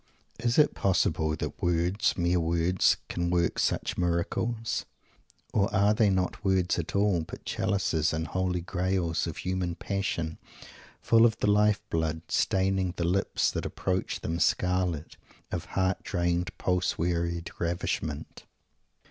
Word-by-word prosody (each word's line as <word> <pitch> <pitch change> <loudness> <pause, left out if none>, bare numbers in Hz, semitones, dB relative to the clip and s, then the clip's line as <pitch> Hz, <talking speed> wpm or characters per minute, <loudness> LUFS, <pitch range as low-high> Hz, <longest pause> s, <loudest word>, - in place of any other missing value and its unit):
Is 120 0 0
it 150 -1 +5
possible 80 -4 +1
that - - -5
words, 85 +3 +1
mere 90 0 +2
words, 85 +2 +2
can 85 0 -2
work 85 -1 +1
such - - 0
miracles? 90 +7 -1 0.7
Or 100 -2 +2
are 100 +2 +4
they 105 -1 +3
not 95 +1 -1
words 95 -3 +2
at 85 - -4
all, 100 -4 +3
but 80 - -9
chalices 90 -6 0
and 80 0 -2
Holy 90 -1 -1
graals, 90 -2 -1
of 80 - -5
human 90 -2 -2
passion, 85 -4 -3 0.6
full 115 0 +5
of 115 -1 +4
the 105 - +2
life 105 0 +3
blood, 80 0 -1
staining 95 -1 +1
the 85 - -1
lips 95 +3 +1
that - - -3
approach 95 0 -2
them 85 +1 -2
scarlet, 90 -3 0 0.3
of - - -3
heart 95 0 0
drained 85 -1 -1
pulse 90 0 0
wearied 85 0 -1
ravishment? 80 -3 -3
90 Hz, 140 wpm, -28 LUFS, 85-95 Hz, 0.7 s, it